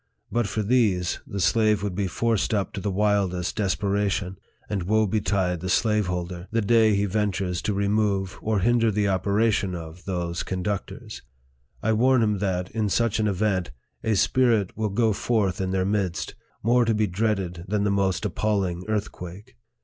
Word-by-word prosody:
But 120 -2 +1
for 105 +2 -2
these, 100 -6 +1
the 100 - -5
slave 105 0 +2
would 100 -3 -2
be 95 +1 -1
forced 115 +2 0
up 100 -2 -1
to 100 - -4
the 105 - -1
wildest 95 -3 0
desperation; 100 -2 -1 0.3
and 100 -3 -2
woe 110 +5 +2
betide 95 -4 0
the 95 +2 -4
slaveholder, 90 -4 0
the 115 +1 0
day 110 -1 +4
he 100 +1 +1
ventures 95 -3 -1
to 105 - -1
remove 100 -1 0
or 110 -2 0
hinder 115 +2 +3
the 105 -1 +1
operation 100 0 +1
of 85 +1 -9
those 85 -2 -2
conductors! 95 +1 -4 0.6
I 110 - +2
warn 125 +2 +4
him 105 -2 +1
that, 95 -2 -2
in 110 -2 -1
such 115 +1 +1
an 110 - +2
event, 95 -2 0 0.3
a 110 -1 +1
spirit 115 -2 +2
will 110 0 -1
go 110 +2 +2
forth 100 -4 0
in 95 - -1
their 95 0 0
midst, 100 -4 -1 0.3
more 120 +3 +4
to 115 -1 +1
be 105 0 +2
dreaded 95 -3 -2
than 105 +1 0
the 100 - +1
most 95 -3 0
appalling 95 -5 -1
earthquake. 105 -1 -5
100 Hz, 170 wpm, -25 LUFS, 95-110 Hz, 0.6 s, day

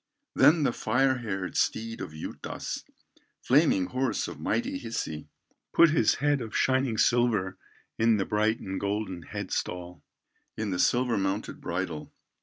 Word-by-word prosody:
Then 155 0 +5
the 120 - +2
fire 130 +3 +1
haired 95 -5 -4
steed 115 +1 -1
of - - -5
Juutas, 80 - -6 0.5
Flaming 130 - +3
horse 130 -2 -1
of - - -8
mighty 115 +5 -1
Hisi, 80 - -4 0.5
Put 170 -2 +6
his 135 -9 +3
head 145 -1 +1
of 110 -2 -4
shining 130 -3 +2
silver, 110 -6 +2 0.4
In 115 -1 +4
the 95 - 0
bright 110 +2 +1
and 95 0 -4
golden 100 -3 -2
head 75 - -6
stall, 90 -3 -4 0.5
In 110 -2 -2
the 90 - -2
silver 120 +3 +2
mounted 95 +2 -2
bridle. 85 -3 -4
110 Hz, 145 wpm, -28 LUFS, 95-125 Hz, 0.5 s, Put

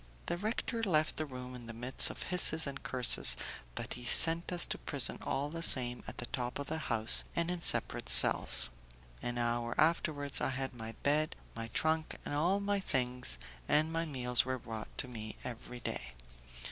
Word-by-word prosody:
The - - -2
rector 225 +3 -3
left 155 -8 +1
the 155 - -2
room 125 -1 -8
in 120 -2 -10
the 115 - -8
midst 125 +2 +4
of - - -7
hisses 170 -3 +2
and 140 -1 -6
curses, 125 -2 +2 0.4
but - - -4
he 125 - -10
sent 165 +8 +6
us 175 -1 +4
to - - -5
prison 140 -4 0
all 140 +2 -3
the 165 +1 -6
same 125 -6 +3
at - - -8
the 120 - -4
top 125 -1 -4
of 140 - -5
the 160 +3 -4
house 115 -5 +3
and 170 +1 -1
in 180 -1 -4
separate - - +3
cells. 60 0 +5 0.5
An 120 0 -4
hour 120 0 -2
afterwards, 155 -3 +1
I - - 0
had 135 0 -4
my 115 -2 -8
bed, 150 +2 +1 0.2
my 115 0 -5
trunk 160 +7 -1
and - - -4
all 175 +7 +1
my 200 0 -1
things, 125 - -1 0.3
and 155 +2 +1
my 165 0 -1
meals 125 -5 +1
were 130 0 -3
brought 110 -2 -8
to - - 0
me 110 -3 -7
every 125 0 -8
day. 65 - -5
135 Hz, 190 wpm, -33 LUFS, 120-160 Hz, 0.5 s, sent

